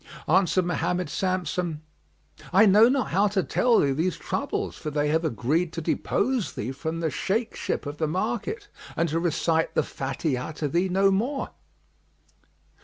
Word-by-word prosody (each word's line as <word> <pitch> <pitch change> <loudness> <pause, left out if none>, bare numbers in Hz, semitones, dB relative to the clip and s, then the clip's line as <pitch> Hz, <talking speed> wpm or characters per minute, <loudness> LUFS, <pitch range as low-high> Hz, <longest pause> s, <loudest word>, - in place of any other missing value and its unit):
Answered 185 +2 +3
Mohammed 180 +1 -1
Samsam, 180 -4 -1 0.7
"I 195 +5 +6
know 210 +4 +7
not 270 0 0
how 200 +4 +3
to 195 -2 0
tell 240 -2 +3
thee 140 - +2
these 160 +4 0
troubles, - - -3
for 155 - -5
they 150 0 0
have 160 +2 +1
agreed 160 +5 0
to - - -3
depose 235 - 0
thee 115 +5 -4
from 160 +4 -4
the 160 -2 0
Shaykh 215 - -1
ship - - -3
of 145 +1 -5
the 155 - 0
market 240 - -2 0.3
and 170 - +1
to 160 +2 0
recite 165 -1 0
the - - +3
Fatihah 135 +1 -3
to 150 0 -2
thee 175 +6 +1
no 195 +2 +3
more." 245 +9 -1
175 Hz, 165 wpm, -26 LUFS, 155-195 Hz, 0.7 s, know